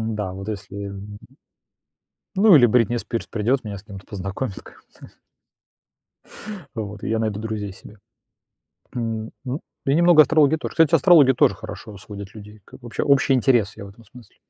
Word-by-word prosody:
Н-да, 105 Hz, -4 st, -3 dB
вот 95 Hz, +2 st, -8 dB
если, 100 Hz, -1 st, -6 dB
м 100 Hz, +1 st, -9 dB, 1.2 s
Ну, 200 Hz, -2 st, +6 dB
или 125 Hz, -4 st, +7 dB
Бритни 120 Hz, 0 st, +2 dB
Спирс 115 Hz, 0 st, -4 dB
придёт, 120 Hz, +5 st, 0 dB
меня 100 Hz, -2 st, -6 dB
с 95 Hz, -, -16 dB
кем-то 100 Hz, -2 st, -11 dB
познакомит 95 Hz, +2 st, -5 dB
ком -, -, -15 dB, 0.3 s
то. -, -, -11 dB, 1.7 s
Вот, 105 Hz, -2 st, -6 dB
и -, -, -3 dB
я 110 Hz, 0 st, 0 dB
найду 110 Hz, -2 st, -2 dB
друзей 105 Hz, -3 st, -5 dB
себе. 105 Hz, +3 st, -15 dB, 1.0 s
М, 115 Hz, -2 st, -3 dB
ну 130 Hz, +2 st, -4 dB, 0.3 s
и 140 Hz, -, +2 dB
немного 170 Hz, -1 st, +6 dB
астрологии 155 Hz, 0 st, +4 dB
тоже. -, -, -6 dB
Кстати, 165 Hz, -3 st, +4 dB
астрология 155 Hz, -8 st, +6 dB
тоже 120 Hz, -, +3 dB
хорошо 105 Hz, -2 st, -9 dB
сводит 100 Hz, +1 st, -10 dB
людей, 105 Hz, 0 st, -12 dB
как -, -, -15 dB
вообще, 120 Hz, -1 st, -4 dB
общий 140 Hz, -1 st, +3 dB
интерес, 120 Hz, -6 st, +2 dB
я 100 Hz, -, -8 dB
в -, -, -11 dB
этом 110 Hz, +4 st, -17 dB
смысле. 120 Hz, +3 st, -17 dB
110 Hz, 170 wpm, -22 LUFS, 100-130 Hz, 1.7 s, или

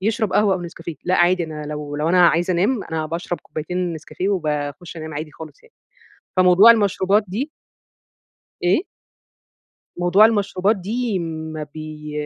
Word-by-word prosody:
يشرب 220 Hz, +1 st, 0 dB
قهوة 205 Hz, -2 st, +3 dB
أو 185 Hz, -, -4 dB
نسكافيه 170 Hz, -1 st, -7 dB
لأ، 180 Hz, -, +1 dB
عادي 175 Hz, 0 st, +3 dB
أنا 155 Hz, -1 st, -7 dB
لو 150 Hz, -1 st, -5 dB
لو 150 Hz, +2 st, 0 dB
أنا 175 Hz, 0 st, +6 dB
عايزة 175 Hz, +2 st, +1 dB
أنام 200 Hz, +6 st, +1 dB
أنا 160 Hz, -1 st, -3 dB
باشرب 170 Hz, +2 st, -4 dB
كوبايتين 175 Hz, +3 st, -3 dB
نسكافيه 165 Hz, +4 st, -4 dB
وباخش 155 Hz, -1 st, -3 dB
أنام 155 Hz, -1 st, -7 dB
عادي 155 Hz, +1 st, -5 dB
خالص 155 Hz, 0 st, -12 dB
يعني. 470 Hz, -, -23 dB, 0.6 s
فموضوع 185 Hz, +5 st, +8 dB
المشروبات 205 Hz, -1 st, +2 dB
دي 240 Hz, -, -3 dB, 1.1 s
إيه؟ 180 Hz, -, +3 dB, 1.1 s
موضوع 180 Hz, +5 st, +5 dB
المشروبات 205 Hz, -1 st, +1 dB
دي 215 Hz, +2 st, -2 dB
ما 160 Hz, -2 st, -5 dB
بي 155 Hz, -1 st, -8 dB
175 Hz, 145 wpm, -21 LUFS, 155-200 Hz, 1.1 s, فموضوع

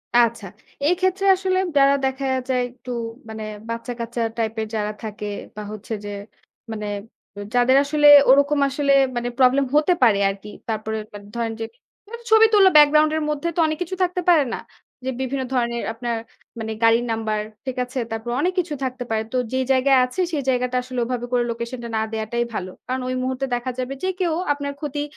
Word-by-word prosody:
আচ্ছা, 235 Hz, -3 st, +3 dB, 0.4 s
এইক্ষেত্রে 375 Hz, +2 st, +1 dB
আসলে 375 Hz, 0 st, 0 dB, 0.2 s
যারা 275 Hz, 0 st, +6 dB
দেখা 265 Hz, +1 st, -2 dB, 0.2 s
যায়, 250 Hz, -1 st, +2 dB
একটু 250 Hz, 0 st, -10 dB, 0.4 s
মানে 220 Hz, 0 st, -6 dB, 0.3 s
বাচ্চাকাচ্চা 235 Hz, 0 st, -4 dB, 0.2 s
টাইপের 220 Hz, -1 st, -2 dB
যারা 210 Hz, -1 st, -1 dB
থাকে, 210 Hz, -1 st, -6 dB, 0.3 s
বা 210 Hz, -, -6 dB
হচ্ছে 215 Hz, +2 st, -7 dB
যে, -, -, -5 dB, 0.6 s
মানে, 210 Hz, -1 st, -4 dB, 0.7 s
যাদের 245 Hz, +2 st, +4 dB
আসলে 295 Hz, +1 st, +3 dB, 0.2 s
ওরকম 285 Hz, +2 st, +5 dB
আসলে 280 Hz, +1 st, +1 dB, 0.2 s
মানে 240 Hz, 0 st, -1 dB
প্রব্লেম 265 Hz, +2 st, +4 dB
হতে 310 Hz, +4 st, +4 dB
পারে 210 Hz, -4 st, +5 dB
আরকি। 200 Hz, +1 st, -7 dB, 0.2 s
তারপরে 220 Hz, 0 st, -2 dB, 0.4 s
ধরেন 230 Hz, -1 st, -1 dB
যে, 225 Hz, -, -2 dB, 0.5 s
একটা 470 Hz, 0 st, -8 dB
ছবি 445 Hz, 0 st, +8 dB
তুললো, 390 Hz, -2 st, +7 dB
ব্যাকগ্রাউন্ড 300 Hz, +1 st, +6 dB
এর 310 Hz, -, -1 dB
মধ্যে 300 Hz, +2 st, -2 dB
তো -, -, -2 dB
অনেক 310 Hz, -, -2 dB
কিছু 365 Hz, +2 st, -6 dB
থাকতে 360 Hz, 0 st, -1 dB
পারে, 320 Hz, -5 st, +6 dB
না? -, -, -3 dB, 0.5 s
যে, -, -, -1 dB
বিভিন্ন 265 Hz, 0 st, -2 dB
ধরনের 235 Hz, -1 st, 0 dB
আপনার 235 Hz, 0 st, -3 dB, 0.4 s
মানে 220 Hz, 0 st, -4 dB
গাড়ির 230 Hz, +1 st, +4 dB
নাম্বার, 220 Hz, -1 st, -1 dB, 0.3 s
ঠিক 260 Hz, -1 st, -4 dB
আছে? 255 Hz, +1 st, -5 dB
তারপর, 225 Hz, +1 st, -4 dB
অনেক 365 Hz, +1 st, +1 dB
কিছু 340 Hz, -4 st, -2 dB
থাকতে 255 Hz, -1 st, -3 dB
পারে। 220 Hz, 0 st, 0 dB
তো 255 Hz, -, +1 dB, 0.2 s
যে, 260 Hz, -, +1 dB
জায়গায় 265 Hz, +1 st, +4 dB
আছে 250 Hz, +9 st, -3 dB
সে 310 Hz, -, -1 dB
জায়গাটা 250 Hz, 0 st, 0 dB
আসলে 255 Hz, 0 st, -5 dB
ওভাবে 245 Hz, -1 st, -3 dB
করে 245 Hz, -1 st, +2 dB
লোকেশন 235 Hz, +2 st, -5 dB
টা 235 Hz, -, -4 dB
না -, -, +1 dB
দেয়াটাই 225 Hz, +2 st, -1 dB
ভালো। 185 Hz, -2 st, -4 dB, 0.2 s
কারণ 255 Hz, +1 st, -2 dB
ওই 255 Hz, -, -1 dB
মুহূর্তে 260 Hz, +1 st, -2 dB
দেখা 245 Hz, +1 st, -3 dB
যাবে 255 Hz, +2 st, -3 dB
যে, -, -, +1 dB
কেউ 345 Hz, -3 st, +1 dB, 0.2 s
আপনার 285 Hz, 0 st, -5 dB
ক্ষতি, 290 Hz, -1 st, -3 dB
255 Hz, 185 wpm, -22 LUFS, 230-285 Hz, 0.7 s, ছবি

